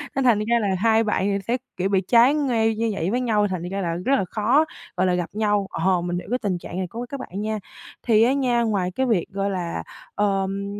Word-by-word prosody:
Nên 270 - +1
thành 235 -5 +4
ra 235 +2 +1
là 210 - 0
hai 225 +1 +3
bạn 210 -3 0
thì 200 0 +1
sẽ, 240 +2 +1 0.2
kiểu, 185 +1 0
bị 195 -1 +2
trái 235 +7 +5
ngay 235 -7 +1
như 225 +1 0
vậy 190 -1 -2
với 245 +2 0
nhau 215 -4 +2
thành 185 -3 -3
ra 195 +1 -3
là 170 -2 -1
rất 275 +1 +4
là 195 - 0
khó, 235 - +2 0.3
gọi 185 +1 +2
là, 180 - +2
gặp 175 -1 -1
nhau, 205 -2 +1
ờ, 180 +1 +1
mình 175 0 -2
hiểu - - -11
cái 250 +2 0
tình 195 -5 -1
trạng 175 +1 -8
này 185 -1 -2
của 235 +7 -6
các 280 - -5
bạn 200 -5 -6
nha. 215 0 -2 0.4
Thì 225 -2 +4
á 250 +3 +3
nha, 250 -4 +1
ngoài 195 -5 0
cái 260 +8 -1
việc, 220 -9 +1
gọi 195 +1 -2
là, 175 - -3 0.3
ờm, 195 -1 0
210 Hz, 255 wpm, -23 LUFS, 190-235 Hz, 0.4 s, trái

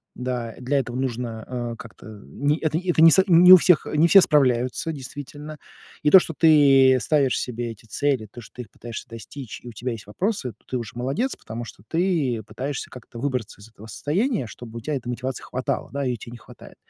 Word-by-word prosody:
Да, 125 -3 -4
для 135 +3 0
этого 120 -1 -5
нужно, 120 -3 -4
а, 120 -2 -4
как-то, 115 -1 -13 0.2
не 145 +3 -1
это 155 -1 -1
это 175 -3 0
не 165 0 +9
со 190 - +5
не 180 +1 +8
у - - +12
всех 180 -1 +3
не 155 +3 +4
все 195 +2 +8
справляются, 130 +1 +1
действительно. 145 +2 -9 0.5
И 150 - +4
то, 190 - +9
что 165 - -5
ты 135 -4 +6
ставишь 140 -4 +1
себе 120 -1 -4
эти 110 0 -14
цели, 130 -2 -1
то, 120 - -10
что - - -16
ты 125 - -6
их - - -20
пытаешься 115 -1 -9
достичь, 115 +2 -9
и - - -11
у - - -9
тебя 120 +3 -5
есть 110 -3 -8
вопросы, 180 - -2
то - - -36
ты 130 - -3
уже 115 -3 -6
молодец, 135 - -2
потому 115 +2 -7
что 100 -3 -12
ты 160 -10 0
пытаешься 135 +4 -5
как-то 120 -2 -12
выбраться 125 -6 -4
из 110 - -14
этого 110 0 -14
состояния, 180 - -1
чтобы 115 0 -10
у - - -12
тя 150 - -4
этой 125 -2 -6
мотивации 130 +1 -4
хватало, 130 +1 -3
да, 140 0 -2
ее 125 -2 -1
те 115 - -11
не 120 - -9
хватает. - - -15
130 Hz, 215 wpm, -23 LUFS, 120-150 Hz, 0.5 s, у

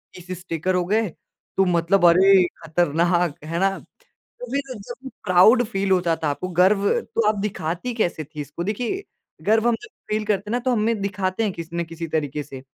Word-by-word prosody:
30 180 0 -7
sticker 180 0 -2
हो 180 - +2
गए 215 +4 +1 0.5
तो 195 - +4
मतलब 175 +1 +2
अरे! 190 +2 +6 0.2
खतरनाक, 170 0 +1
है 165 +2 -3
ना? 195 - +4 0.5
तो - - -12
फिर 275 -2 -2
जब 240 +6 -9 0.2
प्राउड 190 +7 +6
फ़ील 195 -3 -2
होता 175 -3 +3
था 155 - +1
आपको, 165 +6 -3
गर्व, 185 +3 +3 0.2
तो 230 - -1
आप 215 - +3
दिखाती 195 +2 -3
कैसे 175 -8 -1
थी 150 +1 -9
इसको? 150 +4 -5
देखिए 240 - -2 0.4
गर्व 220 +2 +3
हम 235 - +3
जब 420 - -10 0.2
फ़ील 215 0 0
करते 205 0 -1
हैं - - -2
ना, 245 - +2
तो 250 +1 -1
हम 225 - +1
में 225 0 0
दिखाते 195 0 -1
हैं 205 - 0
किसी 170 0 -7
न 170 - 0
किसी 165 0 -6
तरीके 150 -2 -2
से। 135 -2 -10
185 Hz, 205 wpm, -23 LUFS, 170-215 Hz, 0.5 s, अरे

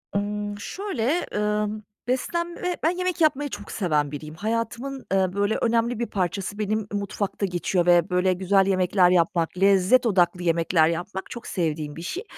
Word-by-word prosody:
Imm, 205 0 -2
şöyle, 350 - -2
ımm, 210 0 -1 0.2
beslenme 340 +7 -2
Ben 320 - +4
yemek 365 -1 -2
yapmayı 295 -2 +2
çok 205 - -8
seven 150 -7 0
biriyim. 155 +1 -7
Hayatımın, 230 +6 -3
ııı, 190 -1 +2
böyle, 205 +2 +1
önemli 230 0 +1
bir 235 - 0
parçası 195 +1 -3
benim, 215 +1 0
ııı, 205 -1 -4
mutfakta 200 0 -3
geçiyor 180 0 0
ve 175 0 +4
böyle 180 +1 +2
güzel 190 +1 +2
yemekler 185 -1 +3
yapmak, 170 -1 +1
lezzet 195 +5 +4
odaklı 180 -4 +2
yemekler 165 -1 +3
yapmak 175 +3 -4
çok 235 -2 -8
sevdiğim 155 -4 -2
bir 165 - -7
şey 365 - -4
200 Hz, 160 wpm, -24 LUFS, 180-230 Hz, 0.2 s, Ben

